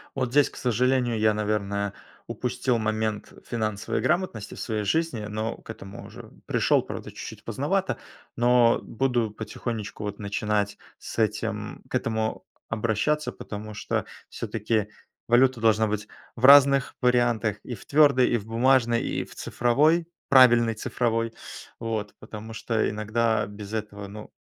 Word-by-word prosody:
Вот 130 Hz, -3 st, -1 dB
здесь, 145 Hz, +2 st, +4 dB
к -, -, -17 dB
сожалению, 125 Hz, -1 st, +1 dB
я, 110 Hz, 0 st, +4 dB
наверное, 100 Hz, -1 st, -1 dB, 0.3 s
упустил 125 Hz, -2 st, -1 dB
момент 110 Hz, -1 st, -2 dB
финансовой 110 Hz, -2 st, -2 dB
грамотности 165 Hz, -, -1 dB
в -, -, -10 dB
своей 110 Hz, -3 st, -2 dB
жизни, 125 Hz, 0 st, 0 dB
но 110 Hz, +2 st, -3 dB
к -, -, -19 dB
этому 100 Hz, -3 st, -9 dB
уже -, -, -11 dB, 0.2 s
пришёл, -, -, +2 dB
правда, -, -, -7 dB
чуть-чуть -, -, -9 dB
поздновато. -, -, -1 dB, 0.4 s
Но 120 Hz, -1 st, +4 dB
буду 120 Hz, -3 st, 0 dB
потихонечку 110 Hz, 0 st, -5 dB
вот 105 Hz, -1 st, -5 dB
начинать 105 Hz, 0 st, -1 dB, 0.2 s
с -, -, -8 dB
этим 110 Hz, -1 st, -1 dB
к -, -, -4 dB
этому 110 Hz, -1 st, -1 dB, 0.3 s
обращаться, 115 Hz, +7 st, 0 dB
потому 105 Hz, +1 st, -8 dB
что 105 Hz, -, -2 dB, 0.2 s
всё-таки 110 Hz, -1 st, -2 dB, 0.4 s
валюта 120 Hz, 0 st, +4 dB
должна 110 Hz, -1 st, +4 dB
быть 105 Hz, 0 st, -3 dB, 0.3 s
в 120 Hz, -, +1 dB
разных 140 Hz, -1 st, +7 dB
вариантах: 120 Hz, -4 st, +2 dB
и 120 Hz, -, -5 dB
в 95 Hz, -, -14 dB
твёрдой, 140 Hz, -4 st, +5 dB
и 120 Hz, -, +2 dB
в 105 Hz, -, -8 dB
бумажной, 120 Hz, +1 st, +3 dB
и -, -, -2 dB
в -, -, -14 dB
цифровой, 155 Hz, +8 st, +2 dB, 0.2 s
правильной 120 Hz, -3 st, +6 dB
цифровой. 115 Hz, 0 st, -1 dB, 0.5 s
Вот, 110 Hz, -3 st, -3 dB
потому 110 Hz, +1 st, -9 dB
что 110 Hz, 0 st, 0 dB
иногда 110 Hz, +1 st, 0 dB
без 105 Hz, +1 st, -9 dB
этого, 105 Hz, -2 st, -5 dB
ну, 105 Hz, +2 st, -10 dB
115 Hz, 140 wpm, -26 LUFS, 105-125 Hz, 0.5 s, разных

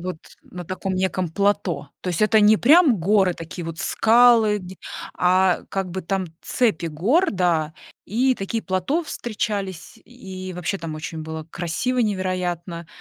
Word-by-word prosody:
вот 180 Hz, -2 st, -5 dB, 0.2 s
на 180 Hz, -1 st, -9 dB
таком 185 Hz, +2 st, -4 dB
неком 185 Hz, -1 st, -1 dB
плато. 175 Hz, -5 st, 0 dB
То -, -, -5 dB
есть 175 Hz, +2 st, -1 dB
это 215 Hz, 0 st, +4 dB
не 210 Hz, +1 st, +6 dB
прям 285 Hz, -, +5 dB
горы, 190 Hz, 0 st, +3 dB
такие 165 Hz, +1 st, -8 dB
вот 165 Hz, -1 st, -6 dB
скалы, 230 Hz, -2 st, +4 dB
где 185 Hz, -1 st, -10 dB, 0.4 s
а, 185 Hz, 0 st, +3 dB
как 190 Hz, -2 st, -3 dB
бы 190 Hz, +1 st, -4 dB
там 190 Hz, +1 st, -2 dB
цепи 210 Hz, -10 st, 0 dB
гор, 225 Hz, -, +2 dB
да, 165 Hz, -4 st, 0 dB, 0.3 s
и 255 Hz, +5 st, +1 dB
такие 220 Hz, +3 st, -3 dB
плато 190 Hz, -, -1 dB
встречались. 210 Hz, -, -4 dB
И 190 Hz, -6 st, -9 dB
вообще 180 Hz, +2 st, -3 dB
там 165 Hz, -2 st, -6 dB
очень 155 Hz, +1 st, -6 dB
было 160 Hz, 0 st, -6 dB
красиво 175 Hz, +11 st, -2 dB
невероятно. 180 Hz, -5 st, -2 dB
185 Hz, 150 wpm, -22 LUFS, 175-215 Hz, 0.4 s, не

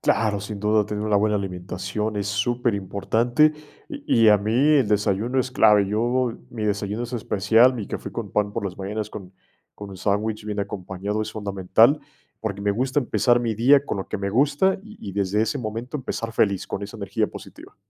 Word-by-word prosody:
Claro, 105 Hz, -2 st, +1 dB
sin 100 Hz, 0 st, -6 dB
duda 105 Hz, 0 st, +2 dB
tener 105 Hz, 0 st, -4 dB
una 105 Hz, -1 st, +2 dB
buena 105 Hz, +1 st, +2 dB
alimentación 95 Hz, +3 st, -4 dB
es 100 Hz, -1 st, -2 dB
superimportante, 115 Hz, +4 st, +1 dB, 0.4 s
y 295 Hz, -3 st, -6 dB, 0.3 s
y -, -, +8 dB
a 105 Hz, -1 st, +6 dB
mí 105 Hz, +2 st, -2 dB
el 140 Hz, 0 st, +4 dB
desayuno 105 Hz, +5 st, +1 dB
es 130 Hz, -, -3 dB
clave. 105 Hz, -5 st, +4 dB
Yo, 120 Hz, +3 st, 0 dB, 0.2 s
mi 110 Hz, -3 st, -4 dB
desayuno 105 Hz, +2 st, -2 dB
es 120 Hz, +1 st, -6 dB
especial, 115 Hz, +3 st, +3 dB
mi 110 Hz, -5 st, -5 dB
café -, -, -6 dB
con -, -, -5 dB
pan 105 Hz, -1 st, 0 dB
por 100 Hz, -, -3 dB
las 95 Hz, -2 st, -5 dB
mañanas 105 Hz, +2 st, -4 dB
con 95 Hz, -2 st, -9 dB, 0.4 s
con 105 Hz, -1 st, -9 dB
un 95 Hz, -, -9 dB
sándwich 105 Hz, +2 st, -1 dB
bien 105 Hz, -1 st, -4 dB
acompañado, 100 Hz, +1 st, -3 dB
es 110 Hz, -, -5 dB
fundamental, 105 Hz, +6 st, +2 dB, 0.4 s
porque 100 Hz, -2 st, -4 dB
me 100 Hz, 0 st, +1 dB
gusta 130 Hz, +6 st, 0 dB
empezar 120 Hz, -1 st, +2 dB
mi 115 Hz, -2 st, -1 dB
día 135 Hz, +5 st, +5 dB
con 110 Hz, -, -3 dB
lo 95 Hz, -, -5 dB
que -, -, -3 dB
me 100 Hz, -, -2 dB
gusta 145 Hz, -, +3 dB
-y 220 Hz, 0 st, -13 dB
y 100 Hz, -, -7 dB
desde 100 Hz, +2 st, 0 dB
ese 140 Hz, +5 st, -1 dB
momento 115 Hz, +5 st, -4 dB
empezar 115 Hz, -4 st, -4 dB
feliz 100 Hz, -4 st, +1 dB
con -, -, -5 dB
esa 105 Hz, +3 st, -7 dB
energía 100 Hz, +2 st, -1 dB
positiva. -, -, -12 dB
105 Hz, 200 wpm, -23 LUFS, 100-120 Hz, 0.4 s, y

